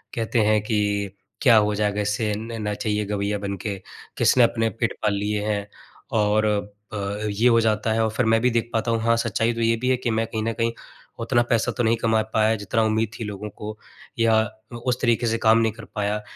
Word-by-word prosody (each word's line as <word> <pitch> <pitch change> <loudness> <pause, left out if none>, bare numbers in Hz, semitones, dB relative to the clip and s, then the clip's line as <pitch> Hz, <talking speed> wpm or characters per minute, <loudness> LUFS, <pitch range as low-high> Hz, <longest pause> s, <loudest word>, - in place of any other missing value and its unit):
कहते 115 0 0
हैं 105 0 +3
कि, 100 -2 -1 0.2
क्या 125 -5 +6
हो 105 0 +3
जाएगा 105 0 0
इससे? 105 +1 -1
न 115 +1 -6
नचइया-गवैया 105 -1 -1
बन 100 -1 -3
के? 105 -3 -3 0.4
किसने 125 - +5
अपने 115 -1 +2
पेट 115 +1 -2
पाल 105 - +2
लिए 105 +1 -1
हैं? 105 -1 -1 0.5
और 105 0 +2 0.5
अ, - - -3 0.3
ये 105 +4 +2
हो 115 -1 +5
जाता 110 0 +1
है 115 0 +1
और 110 - +1
फिर 120 +3 0
मैं 115 0 +4
भी 125 - +3
देख 115 0 0
पाता 115 +1 0
हूँ, 115 - +1
हाँ, 115 +1 +3
सच्चाई 115 0 0
तो 115 - -4
ये 115 0 +3
भी 125 - 0
है 130 - +4
कि 120 -1 -2
मैं 110 0 0
कहीं 110 0 -3
न 115 +1 -1
कहीं 115 +1 0 0.5
उतना 120 +1 +2
पैसा 115 -2 +2
तो 120 - +1
नहीं 115 0 +3
कमा 110 -1 +2
पाया, 110 +1 +3
जितना 105 +2 0
उम्मीद 110 0 +1
थी - - -3
लोगों 105 0 -6
को 105 +1 -8 0.4
या 115 -1 +4 0.5
उस 125 -1 0
तरीके 120 -1 +2
से 115 0 +1
काम 110 0 +4
नहीं 115 -1 +2
कर 115 0 -11
पाया, 105 0 -1
110 Hz, 220 wpm, -23 LUFS, 105-115 Hz, 0.5 s, क्या